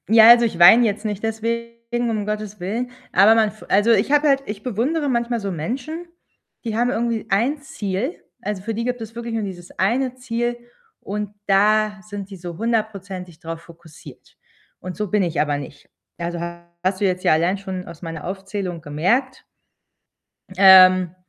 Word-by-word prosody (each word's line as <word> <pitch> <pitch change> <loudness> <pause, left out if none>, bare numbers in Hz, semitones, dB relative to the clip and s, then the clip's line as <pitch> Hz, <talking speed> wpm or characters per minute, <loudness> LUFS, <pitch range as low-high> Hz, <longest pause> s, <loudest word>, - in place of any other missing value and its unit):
Ja, 225 0 +8
also 235 0 +8
ich 215 -7 -3
weine 220 +8 +8
jetzt 210 0 -2
nicht 210 -1 -3
deswegen, 235 +1 -3
um 215 -2 -2
Gottes 210 -1 -4
Willen. 225 +8 -3 0.2
Aber 205 +4 +6
man 220 -1 +3
f 215 +1 -14
also 205 +4 +4
ich 230 - +2
habe 295 +1 +4
halt 275 -1 +3
ich 210 0 -7
bewundere 275 +6 -1
manchmal 235 -1 0
so 200 -2 -4
Menschen, 255 - -5 0.6
die 225 -3 -3
haben 240 +2 +1
irgendwie 235 -2 -1
ein 240 +10 +1
Ziel. 225 - -4 0.2
Also, 205 -3 -4
für 225 - -3
die 230 +2 -3
gibt 250 0 -2
es 225 0 -8
wirklich 235 -1 -5
nur 225 - -1
dieses 180 -3 -7
eine 245 +6 0
Ziel 240 -1 -3 0.4
und 210 +1 -4 0.2
da 210 +1 +3
sind 205 -1 -8
sie 195 -1 -10
so 175 -1 -8
hundertprozentig 200 -6 -3
drauf 165 0 -7
fokussiert 170 -2 -15 0.4
und 185 -1 -7
so 210 -2 -3
bin 210 - +2
ich 170 -3 -1
aber 145 -1 0
nicht. 145 +1 -11 0.3
Also 170 0 -4 0.4
hast 185 +1 -1
du - - +3
jetzt 185 -1 -1
ja - - +4
allein 170 +5 +1
schon 190 -2 -6
aus 165 - -11
meiner 165 -3 -7
Aufzählung 190 -2 -5
gemerkt. 190 - -1 1.1
Ähm, 185 -2 +7
210 Hz, 180 wpm, -21 LUFS, 185-235 Hz, 1.1 s, Ja